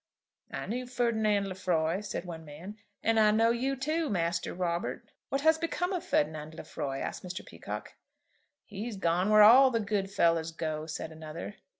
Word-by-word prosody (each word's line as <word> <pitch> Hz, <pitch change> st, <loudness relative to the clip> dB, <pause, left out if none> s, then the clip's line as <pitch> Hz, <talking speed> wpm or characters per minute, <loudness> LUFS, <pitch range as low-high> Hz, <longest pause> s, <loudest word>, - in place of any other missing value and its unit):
"I -, -, -4 dB
knew 250 Hz, +3 st, -3 dB
Ferdinand 220 Hz, -5 st, +1 dB
Lefroy," 180 Hz, -2 st, 0 dB
said 205 Hz, -3 st, -5 dB
one 165 Hz, -2 st, -7 dB
man, 160 Hz, +7 st, -9 dB, 0.3 s
"and 225 Hz, 0 st, +3 dB
I 215 Hz, -1 st, +6 dB
know 225 Hz, +2 st, +4 dB
you 260 Hz, +3 st, 0 dB
too, 310 Hz, +4 st, -1 dB
Master 170 Hz, -3 st, -1 dB
Robert." 175 Hz, -1 st, -2 dB, 0.2 s
"What 275 Hz, -, 0 dB
has 320 Hz, +1 st, +4 dB
become 355 Hz, +3 st, -1 dB
of 360 Hz, -, -2 dB
Ferdinand 155 Hz, +1 st, -1 dB
Lefroy?" 135 Hz, -4 st, -5 dB
asked -, -, -4 dB
Mr. 180 Hz, 0 st, -6 dB
Peacocke. -, -, -7 dB, 0.7 s
"He's 210 Hz, +1 st, -6 dB
gone 180 Hz, +2 st, +1 dB
where 215 Hz, 0 st, +8 dB
all 255 Hz, +5 st, +9 dB
the 230 Hz, -2 st, 0 dB
good 200 Hz, -2 st, -1 dB
fellows 165 Hz, -4 st, +2 dB
go," 155 Hz, -1 st, -3 dB
said 160 Hz, 0 st, -5 dB
another. 160 Hz, +5 st, -8 dB
195 Hz, 170 wpm, -30 LUFS, 165-235 Hz, 0.7 s, all